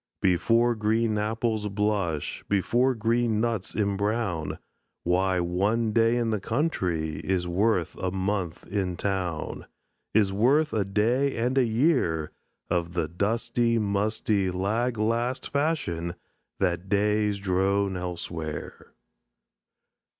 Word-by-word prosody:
Before 115 +6 +3
green 110 0 +1
apples 110 0 -1
blush, 100 -6 -1
Before 120 +6 +2
green 115 0 +1
nuts 115 -4 -1
embrown, 100 -4 -1 0.5
Why, 90 +1 +2
one 100 +6 +1
day 115 +1 +3
in 115 -2 0
the 110 - 0
country 90 - -1
Is 90 -2 -1
worth 90 0 +1
a 95 - -1
month 95 -2 -2
in 95 -3 -2
town; 90 -5 -3 0.5
Is 100 -3 +4
worth 140 +9 +3
a 110 - +2
day 115 +8 +1
and 125 +3 0
a 135 - +5
year 110 - +1 0.4
Of 85 -1 -1
the 85 -3 0
dusty, 115 +6 0
musty, 100 -1 0
lag 110 +7 -1
last 115 +4 0
fashion 90 - -1 0.4
That 90 0 0
days 105 0 +2
drone 100 0 +1
elsewhere. 85 -4 -5
105 Hz, 115 wpm, -27 LUFS, 90-115 Hz, 0.5 s, a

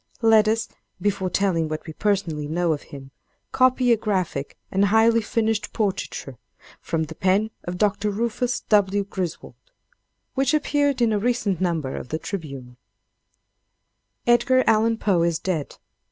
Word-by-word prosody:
Let 220 -1 +6
us, 225 +1 +1 0.3
before 195 -1 -1
telling 175 -4 +1
what 155 0 -5
we 160 - -7
personally 170 -7 -1
know 170 +1 +1
of 145 - -5
him, 135 -1 -10 0.4
copy 255 -1 +3
a 230 - +5
graphic 185 -10 -2
and 195 +1 +3
highly 225 +2 +4
finished 220 0 -1
portraiture, 190 - -3 0.4
from 160 -1 -2
the 155 - -7
pen 195 +4 +1
of 175 0 -4
Dr. 210 +1 +1
Rufus 235 +4 -1
W. 205 -1 +2
Griswold, 185 -4 -5 0.8
which 270 +2 +2
appeared 285 -4 +1
in 225 -2 +2
a 210 - +1
recent 220 -5 0
number 165 -7 -1
of 125 - -7
the 155 - -1
"Tribune": 140 -10 -7 1.5
"Edgar 240 +2 +4
Allen 225 +1 +3
Poe 195 -6 +1
is 170 -1 +1
dead. 165 -4 -3
200 Hz, 145 wpm, -23 LUFS, 165-225 Hz, 1.5 s, Let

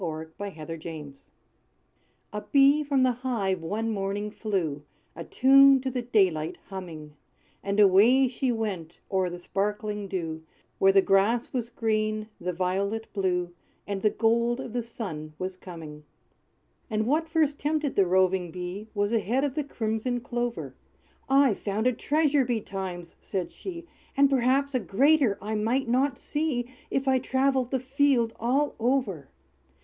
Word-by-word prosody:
=The 160 -2 -4
Bee, 205 -1 -4
Clover, 155 0 -7
and 165 - -9 0.3
Thistle= 135 - -24 1.1
A 210 - -3
bee 280 +2 +5
from 275 -3 +2
the 255 - +4
hive 230 -7 -2
one 215 +7 -2
morning 205 +1 -2
flew, 180 -10 -2 0.3
A 165 - -6
tune 275 +5 +6
to 260 0 -2
the 250 0 -2
daylight 190 -10 +1
humming; 165 -6 -8 0.5
And 200 +1 -1
away 215 +7 +6
she 255 +1 -1
went 195 -8 -4
o'er 190 -2 +1
the 175 - -6
sparkling 210 +3 -3
dew, 165 -4 -4 0.4
Where 195 - +6
the 195 0 +5
grass 205 +5 +2
was 240 -3 -2
green, 215 -2 -1
the 180 +1 -2
violet 195 +5 -2
blue, 180 -3 -1 0.3
And 200 -1 -3
the 215 - +4
gold 235 +3 +1
of 260 -4 -6
the 245 - 0
sun 180 -10 -7
was 185 0 -4
coming. 160 -5 -10 0.9
And 215 -1 0
what 315 +6 +1
first 310 -3 +1
tempted 300 -1 -1
the 195 -2 +4
roving 185 -1 +2
Bee, 180 +4 -6
Was 205 +2 0
a 230 - +4
head 240 +7 0
of 285 -3 0
the 300 +1 -1
crimson 235 -1 -2
clover. 240 0 -3 0.6
"I've 270 -5 +4
found 210 +2 -2
a 255 - +3
treasure 290 +2 +2
betimes!" 190 -7 -4
said 185 -3 -4
she, 345 -3 -8 0.3
"And 280 0 +5
perhaps 270 +2 +2
a 255 - +2
greater 260 +1 +3
I 215 +1 -3
might 230 +5 0
not 255 +2 +1
see, 265 -5 -2 0.2
If 270 0 -1
I 260 -1 +4
travelled 260 -1 +1
the 265 - 0
field 260 -3 +2
all 270 +6 +1
over. 230 - 0
220 Hz, 160 wpm, -27 LUFS, 190-260 Hz, 1.1 s, tune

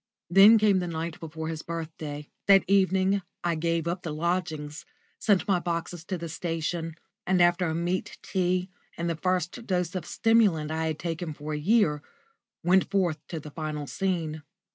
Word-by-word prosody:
Then 200 +5 +9
came 210 -3 +4
the 180 - -2
night 165 0 -4
before 160 0 -6
his 160 -1 -4
birthday. 155 -3 -6 0.2
That 195 -2 +7
evening 190 0 +3 0.2
I 175 -1 +1
gave 165 0 -1
up 175 +2 -2
the 160 - -4
lodgings, 155 -2 -2 0.4
sent 205 -1 +2
my 190 -3 +3
boxes 170 -1 -3
to 185 0 -3
the 170 0 -5
station, 165 0 -3 0.3
and 185 0 +3
after 175 +1 +4
a 160 - -1
meat 175 +2 -2
tea 185 0 0 0.3
and 170 - -2
the 170 - 0
first 185 +6 -2
dose 180 -2 0
of 180 -3 -4
stimulant 205 -10 +3
I 160 0 -1
had 155 -1 -2
taken 165 -1 -4
for 150 +1 -6
a - - -1
year, 160 -4 +3 0.6
went 185 +2 +3
forth 180 -6 +1
to 165 - -5
the 150 0 -10
final 155 -1 -4
scene. 165 -3 -2
170 Hz, 175 wpm, -27 LUFS, 160-185 Hz, 0.6 s, Then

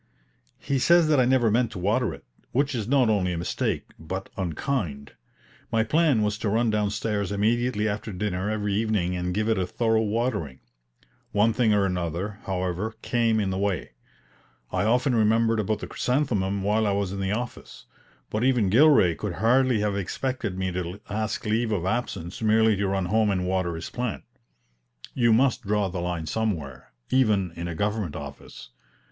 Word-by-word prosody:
He 140 -1 -1
says 170 +4 +5
that 150 -3 +4
I 125 - +4
never 125 -3 +3
meant 120 +1 +2
to - - -7
water 105 +4 +1
it, - - -11 0.3
which 140 +2 +1
is 110 -4 -3
not 130 -1 +3
only 95 -5 +1
a - - -3
mistake, 85 - -2
but 95 +5 -5
unkind. 85 - -3 0.6
My 110 0 +3
plan 145 -2 +2
was 105 0 -1
to 105 - -1
run 115 +2 +2
downstairs 105 -1 -1
immediately 110 +2 +1
after 110 +1 -3
dinner 95 0 -2
every 105 -2 -1
evening 105 -4 0
and 90 0 -2
give 105 +4 -1
it 110 -3 +2
a 90 - -1
thorough 110 +2 +1
watering. 105 - -2 0.7
One 105 +2 +3
thing 115 -1 +2
or 100 -1 +3
another, 90 +2 -3
however, 95 +3 -2
came 115 -2 +1
in 100 -2 0
the 95 - -2
way. 100 -9 -1 0.8
I 95 +2 0
often 125 +4 +2
remembered 115 0 +3
about 110 +1 0
the - - -5
chrysanthemum 105 -8 0
while 105 +2 +2
I 100 - +1
was 100 -2 -1
in 100 - -5
the 95 +1 -1
office; 120 +2 -6 0.5
but 110 +2 -1
even 125 -7 +2
Gilray 130 - +6
could 105 0 -4
hardly 120 +4 +3
have 105 -1 0
expected 100 +1 -3
me 95 0 -1
to 90 +2 -4
ask 110 +2 -2
leave 110 +1 0
of 95 -5 -1
absence 95 -4 -3
merely 110 0 +4
to 100 0 -1
run 95 -1 0
home 110 +3 +2
and 90 -2 0
water 90 -2 -1
his 80 - -6
plant. 125 -4 -3 0.9
You 120 -2 +3
must 125 +3 +3
draw 105 -1 0
the 90 -1 -4
line 85 -2 -3
somewhere, 80 - -3 0.2
even 105 -9 +2
in 85 +1 -6
a 85 - -4
government 105 -3 -2
office. 70 -4 -9
105 Hz, 180 wpm, -25 LUFS, 95-115 Hz, 0.9 s, Gilray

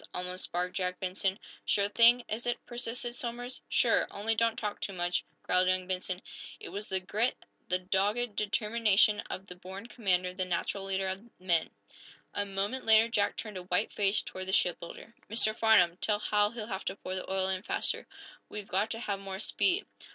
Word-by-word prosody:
almost 180 +1 -3
barked 180 +1 -1
Jack 180 -1 -1
Benson. 190 +1 -1 0.3
"Sure 200 -1 +2
thing, 235 +3 +6
is 225 +3 -3
it?" 240 - +1
persisted 240 0 -3
Somers. 245 +1 -4
"Sure - - +3
only 215 +3 0
don't 230 0 +2
talk 210 -2 -3
too 200 - -3
much," 175 0 0 0.2
growled 185 0 +3
young 185 0 +2
Benson. 185 0 -3 0.4
It - - -7
was 205 +1 -5
the 190 -1 +1
grit, 215 +6 0 0.3
the 180 - +2
dogged 200 +5 0
determination 210 0 +3
of 190 - -5
the 180 - -9
born 190 +3 -9
commander 185 -7 0
the 185 0 -1
natural 185 +2 -2
leader 195 0 0
of 195 +5 -5
men. 175 -3 +2 0.6
A 205 0 -1
moment 200 +6 -2
later 225 +1 +6
Jack 205 -3 +1
turned 215 -3 -5
a 180 - -6
white 180 +4 +1
face 200 0 +2
toward 185 0 -6
the 190 - -2
shipbuilder. 175 +6 -1 0.2
"Mr. 215 0 +1
Farnum, 180 -7 +5
tell 210 +1 +1
Hal 210 0 +3
he'll 225 -1 -6
have 195 -3 -5
to 190 - -2
pour 185 -2 -6
the 185 0 -4
oil 190 0 +1
in 190 -1 -1
faster. - - -2 0.4
We've 210 -1 -6
got 200 +4 +1
to 225 - -3
have 200 -4 -2
more 195 -1 -5
speed." 365 - +1
200 Hz, 190 wpm, -31 LUFS, 185-220 Hz, 0.6 s, thing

